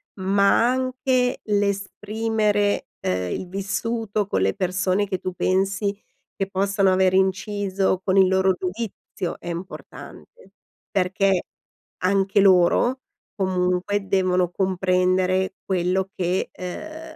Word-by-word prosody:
ma 200 Hz, +4 st, +3 dB
anche 255 Hz, 0 st, 0 dB
l'esprimere, 205 Hz, +1 st, 0 dB
uhm, 90 Hz, 0 st, -1 dB
il 185 Hz, -, -4 dB
vissuto 205 Hz, +2 st, -2 dB
con 95 Hz, -, 0 dB
le 95 Hz, 0 st, +2 dB
persone 185 Hz, +2 st, 0 dB
che 190 Hz, -1 st, -2 dB
tu 185 Hz, -, -4 dB
pensi 195 Hz, +2 st, 0 dB, 0.4 s
che 195 Hz, -1 st, -3 dB
possano 195 Hz, 0 st, +2 dB
aver 185 Hz, 0 st, +3 dB
inciso 190 Hz, 0 st, 0 dB
con 190 Hz, 0 st, +1 dB
il 190 Hz, -1 st, +6 dB
loro 190 Hz, 0 st, +3 dB
giudizio 185 Hz, -1 st, -5 dB
è -, -, -11 dB
importante, 185 Hz, -, -9 dB, 0.4 s
perché 190 Hz, -1 st, +1 dB, 0.6 s
anche 195 Hz, +1 st, +2 dB
loro 195 Hz, +7 st, +4 dB, 0.3 s
comunque 185 Hz, +1 st, 0 dB
devono 185 Hz, -2 st, +1 dB
comprendere 185 Hz, 0 st, +1 dB
quello 185 Hz, +1 st, 0 dB
che, 180 Hz, +1 st, -1 dB
uhm, 315 Hz, -, -8 dB
190 Hz, 110 wpm, -23 LUFS, 185-205 Hz, 0.6 s, il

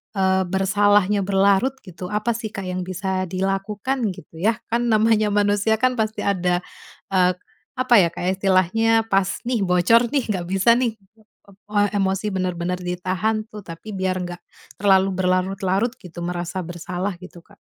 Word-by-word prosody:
eee, 190 Hz, -1 st, +2 dB
bersalahnya 205 Hz, +1 st, +2 dB
berlarut 200 Hz, +6 st, +2 dB
gitu, 180 Hz, -1 st, -8 dB
apa 210 Hz, +4 st, -1 dB
sih, 225 Hz, -1 st, -4 dB
Kak, 195 Hz, -2 st, -7 dB
yang 185 Hz, 0 st, -3 dB
bisa 185 Hz, 0 st, -2 dB
dilakukan, 195 Hz, +6 st, -2 dB
gitu, 160 Hz, +2 st, -13 dB
ya, 220 Hz, +4 st, +2 dB, 0.2 s
kan 240 Hz, +1 st, +1 dB
namanya 215 Hz, -1 st, +3 dB
manusia 205 Hz, +1 st, +2 dB
kan 250 Hz, +1 st, 0 dB
pasti 220 Hz, 0 st, -1 dB
ada, 180 Hz, -2 st, 0 dB, 0.5 s
eee, 185 Hz, -1 st, +3 dB, 0.4 s
apa 255 Hz, -2 st, +3 dB
ya, 185 Hz, -, +6 dB, 0.2 s
istilahnya 195 Hz, +4 st, +2 dB
pas 195 Hz, -1 st, +1 dB
nih, 230 Hz, -6 st, 0 dB
bocor 180 Hz, +7 st, +4 dB
nih, 265 Hz, -6 st, 0 dB
nggak 185 Hz, -4 st, -1 dB
bisa 195 Hz, +6 st, +3 dB
nih, 240 Hz, -3 st, 0 dB, 0.8 s
eee, 205 Hz, 0 st, +3 dB
emosi 195 Hz, +1 st, 0 dB
bener-bener 180 Hz, -1 st, -2 dB
ditahan 185 Hz, +5 st, -1 dB
tuh, 210 Hz, -, -9 dB
tapi 165 Hz, +5 st, -9 dB
biar 185 Hz, -1 st, -1 dB
nggak 175 Hz, 0 st, -6 dB, 0.4 s
terlalu 195 Hz, -1 st, +4 dB
berlarut-larut 190 Hz, +3 st, +1 dB
gitu, 175 Hz, -1 st, -11 dB
merasa 175 Hz, +1 st, -3 dB
bersalah 175 Hz, +2 st, -4 dB
gitu, 175 Hz, -1 st, -13 dB
Kak. -, -, -22 dB
195 Hz, 150 wpm, -22 LUFS, 185-215 Hz, 0.8 s, ya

